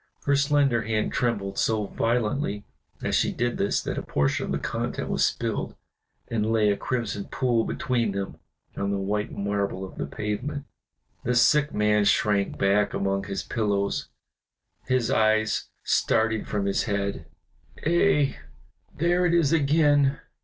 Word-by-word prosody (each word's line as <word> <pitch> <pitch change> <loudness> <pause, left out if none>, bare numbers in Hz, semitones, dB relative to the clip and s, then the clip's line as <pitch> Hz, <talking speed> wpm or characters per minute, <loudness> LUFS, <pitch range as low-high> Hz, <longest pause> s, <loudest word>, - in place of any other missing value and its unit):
Her 140 - +2
slender 140 -4 +3
hand 110 -1 -1
trembled 105 -5 -1
so 110 -2 +1
violently 115 0 -1 0.4
as - - -1
she - - +2
did 120 0 -2
this 100 - +1
that - - -3
a - - -4
portion 70 -1 0
of - - -4
the - - +1
contents - - -3
was - - +1
spilled, - - -1 0.5
and 110 -1 -1
lay 110 -2 +3
a - - +1
crimson 110 -4 -3
pool 120 -3 0
between 120 -4 -1
them 100 0 -4 0.4
on 100 - -2
the 100 - 0
white 105 +3 -2
marble 100 -1 -2
of 95 - -12
the - - -2
pavement. 125 +8 -4 0.6
The 125 - 0
sick 145 +5 +4
man 105 0 +2
shrank 105 -1 +2
back 100 +1 +2
among 100 0 -1
his 100 -1 -4
pillows, 100 -3 -1 0.8
his 130 -2 +1
eyes 110 -2 +2 0.2
starting 110 0 +1
from 105 -2 -2
his 100 - 0
head. 100 -5 -2 0.6
"Ay! 165 -4 +3 0.6
there 175 +3 +2
it 170 - +2
is 165 -3 +3
again!" 145 -2 +3
110 Hz, 150 wpm, -26 LUFS, 100-135 Hz, 0.8 s, sick